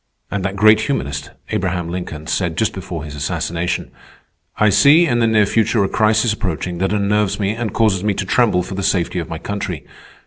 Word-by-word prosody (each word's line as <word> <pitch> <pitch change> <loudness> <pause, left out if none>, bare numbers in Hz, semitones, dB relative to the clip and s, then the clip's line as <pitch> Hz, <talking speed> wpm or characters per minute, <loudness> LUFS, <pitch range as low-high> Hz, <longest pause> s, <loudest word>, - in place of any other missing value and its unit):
And 100 -2 -2
that 100 +1 -2
great 110 +1 +5
humanist, 70 - -3 0.2
Abraham 90 -5 -1
Lincoln, 85 -3 -6
said, 85 -1 -1
just 110 - +1
before 90 -4 -6
his 75 -2 -8
assassination: 85 +4 -3 0.7
"_I 105 -2 +4
see 155 - +6
in 120 -6 +1
the 115 - +3
near 110 -2 +4
future 110 0 +1
a - - +1
crisis 110 +1 +2
approaching 90 -5 -3
that 95 +1 0
unnerves 105 0 +1
me 100 -1 0
and 110 -1 -3
causes 105 -4 +1
me 105 -2 0
to 95 - -3
tremble 105 -4 +2
for 95 - -7
the 95 - -3
safety 90 -2 0
of 85 - -5
my 80 - -4
country. 100 -3 -5
100 Hz, 200 wpm, -18 LUFS, 90-110 Hz, 0.7 s, see